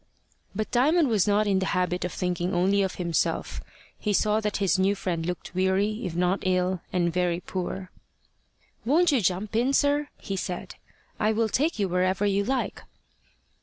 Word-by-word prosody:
But 215 Hz, +1 st, -3 dB
Diamond 295 Hz, +5 st, +3 dB
was 210 Hz, -5 st, +2 dB
not 205 Hz, +1 st, +3 dB
in 195 Hz, -2 st, +2 dB
the 190 Hz, -, -1 dB
habit 180 Hz, 0 st, 0 dB
of 180 Hz, -, -2 dB
thinking 180 Hz, 0 st, -2 dB
only 195 Hz, +3 st, +3 dB
of 190 Hz, -1 st, -1 dB
himself. 170 Hz, -2 st, -1 dB, 0.4 s
He 210 Hz, -, -1 dB
saw 210 Hz, +2 st, +2 dB
that 210 Hz, -1 st, -2 dB
his 195 Hz, -3 st, +1 dB
new 195 Hz, +2 st, +3 dB
friend 180 Hz, -4 st, -2 dB
looked 180 Hz, +1 st, -5 dB
weary, 190 Hz, +4 st, +1 dB
if 165 Hz, -, -6 dB
not 180 Hz, +2 st, +1 dB
ill, 185 Hz, -1 st, 0 dB
and 170 Hz, -2 st, 0 dB
very 175 Hz, -1 st, 0 dB
poor. 185 Hz, 0 st, -5 dB, 0.9 s
"Won't 325 Hz, +8 st, +3 dB
you 265 Hz, -5 st, +2 dB
jump 195 Hz, +3 st, -1 dB
in, 250 Hz, +4 st, +2 dB
sir?" 285 Hz, +1 st, +2 dB
he 195 Hz, -, -5 dB
said. 180 Hz, 0 st, -4 dB, 0.5 s
"I 215 Hz, +1 st, +2 dB
will 225 Hz, 0 st, +1 dB
take 305 Hz, +10 st, 0 dB
you 200 Hz, -2 st, +1 dB
wherever 185 Hz, +2 st, +1 dB
you 200 Hz, 0 st, +2 dB
like." 260 Hz, +4 st, -2 dB
195 Hz, 175 wpm, -26 LUFS, 180-215 Hz, 0.9 s, Diamond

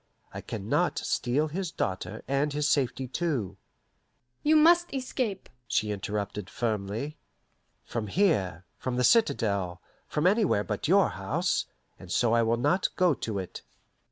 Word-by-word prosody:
I -, -, -5 dB
can -, -, -6 dB
not -, -, +1 dB
steal 135 Hz, +6 st, 0 dB
his 180 Hz, +3 st, -3 dB
daughter 95 Hz, -, -3 dB
and 140 Hz, +2 st, +1 dB
his 150 Hz, 0 st, +1 dB
safety 135 Hz, -2 st, +1 dB
too 125 Hz, -, -2 dB, 0.4 s
" 120 Hz, 0 st, -47 dB
"You 310 Hz, +1 st, +4 dB
must 340 Hz, +3 st, +5 dB
escape," 250 Hz, -6 st, -2 dB, 0.2 s
she 105 Hz, -1 st, 0 dB
interrupted 100 Hz, -1 st, -4 dB
firmly. 110 Hz, +6 st, -3 dB, 0.7 s
"From 115 Hz, -2 st, -3 dB
here, 95 Hz, -, +1 dB
from 130 Hz, -1 st, -2 dB
the 125 Hz, -, +1 dB
citadel, 100 Hz, -, +2 dB, 0.3 s
from 150 Hz, -, -1 dB
anywhere 190 Hz, -, +3 dB
but -, -, -3 dB
your -, -, +5 dB
house; -, -, -1 dB, 0.3 s
and 90 Hz, -, -11 dB
so 115 Hz, +2 st, +2 dB
I 115 Hz, -, +4 dB
will 115 Hz, +1 st, +2 dB
not 180 Hz, +10 st, +2 dB
go 180 Hz, -3 st, +4 dB
to 110 Hz, -5 st, -4 dB
it." 95 Hz, -2 st, -6 dB
125 Hz, 150 wpm, -28 LUFS, 105-175 Hz, 0.7 s, must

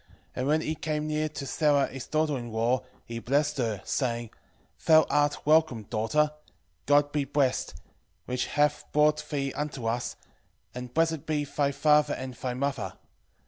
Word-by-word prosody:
And 130 Hz, -, -2 dB
when 155 Hz, +2 st, +3 dB
he 155 Hz, -, -2 dB
came 150 Hz, -1 st, -2 dB
near 155 Hz, 0 st, -1 dB
to 145 Hz, -2 st, -6 dB
Sara 145 Hz, 0 st, +2 dB
his 135 Hz, -2 st, -8 dB
daughter 155 Hz, -1 st, +1 dB
in 120 Hz, -3 st, -5 dB
law, 115 Hz, +3 st, +1 dB, 0.2 s
he 115 Hz, 0 st, -5 dB
blessed 145 Hz, +4 st, 0 dB
her, 110 Hz, -5 st, -1 dB
saying, 120 Hz, -4 st, -1 dB, 0.6 s
Thou 160 Hz, -1 st, +7 dB
art 145 Hz, 0 st, +1 dB
welcome, 155 Hz, -7 st, +3 dB
daughter: 115 Hz, +9 st, +1 dB, 0.6 s
God 145 Hz, 0 st, +4 dB
be 145 Hz, -1 st, 0 dB
blessed, 135 Hz, -2 st, 0 dB, 0.5 s
which 125 Hz, 0 st, -2 dB
hath 150 Hz, 0 st, +1 dB
brought 150 Hz, 0 st, +3 dB
thee 140 Hz, -2 st, -2 dB
unto 145 Hz, -5 st, -4 dB
us, 120 Hz, +2 st, -1 dB, 0.6 s
and 125 Hz, 0 st, -7 dB
blessed 160 Hz, 0 st, 0 dB
be 150 Hz, -2 st, 0 dB
thy 140 Hz, 0 st, 0 dB
father 150 Hz, +1 st, +3 dB
and 130 Hz, -1 st, -6 dB
thy 125 Hz, 0 st, -4 dB
mother. 140 Hz, 0 st, -2 dB
145 Hz, 160 wpm, -28 LUFS, 125-150 Hz, 0.6 s, Thou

